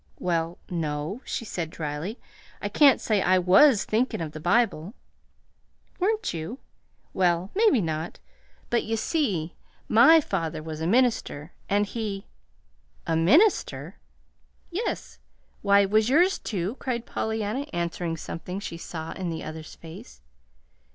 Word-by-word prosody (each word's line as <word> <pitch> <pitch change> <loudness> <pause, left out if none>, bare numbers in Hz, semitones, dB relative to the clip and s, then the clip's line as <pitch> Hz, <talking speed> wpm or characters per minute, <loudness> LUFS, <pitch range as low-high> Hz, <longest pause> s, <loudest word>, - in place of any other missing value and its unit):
"Well, 170 -1 -1
no," 160 - -3
she 230 - -4
said 170 -6 -4
dryly. 160 - -5 0.4
"I - - -3
can't 285 -3 +5
say 210 -3 +1
I 185 0 +4
WAS 195 +7 +5
thinkin' 235 +4 0
of 160 -2 -4
the 155 - -8
Bible." 190 - +1 1.0
"Weren't 425 - 0
you? 165 +9 -5 0.6
Well, 180 0 +1
maybe 415 - +4
not; 160 -1 -3 0.5
but, 240 - +2
you 225 +1 -2
see, 205 - -1 0.3
MY 265 +9 +7
father 160 - -3
was 160 0 -6
a 160 - -1
minister, 220 - +1 0.2
and 205 +1 +2
he 205 -2 -4 0.4
" - - -37
"A 165 - 0
MINISTER?" 280 - +3 0.7
"Yes. 400 +7 -4 0.4
Why, 200 0 +5
was 215 +3 +2
yours, 350 +8 +4
too?" 195 +4 -3
cried 240 -3 -3
Pollyanna, 220 +5 -2
answering 170 -1 -2
something 180 +4 -6
she 170 -4 -6
saw 165 -1 -6
in 185 -1 -4
the 165 -1 -4
other's 155 0 -8
face. 175 +9 -12
190 Hz, 135 wpm, -26 LUFS, 165-235 Hz, 1.0 s, MY